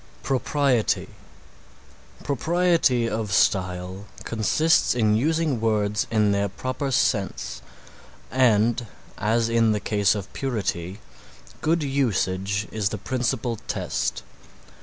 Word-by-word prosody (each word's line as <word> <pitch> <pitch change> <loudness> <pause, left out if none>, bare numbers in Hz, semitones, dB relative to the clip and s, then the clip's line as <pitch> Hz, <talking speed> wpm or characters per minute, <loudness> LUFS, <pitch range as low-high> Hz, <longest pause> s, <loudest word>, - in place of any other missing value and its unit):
PROPRIETY 135 -3 +1 1.1
Propriety 160 -3 +2
of 110 -2 -3
style 95 0 0 0.2
consists 140 +8 +2
in 110 -3 +3
using 155 0 +1
words 105 -2 +1
in 105 -2 +2
their 100 0 +1
proper 130 +7 -4
sense 95 - 0 0.7
and 120 -2 +3 0.3
as 115 +2 +1
in 115 -1 +3
the 105 - -1
case 105 -1 +1
of 100 -2 -6
purity, 100 -7 -3 0.6
good 165 0 +1
usage 105 -7 0
is 105 -3 0
the 110 - -4
principal 120 +1 -2
test. - - -2
110 Hz, 100 wpm, -24 LUFS, 100-130 Hz, 1.1 s, in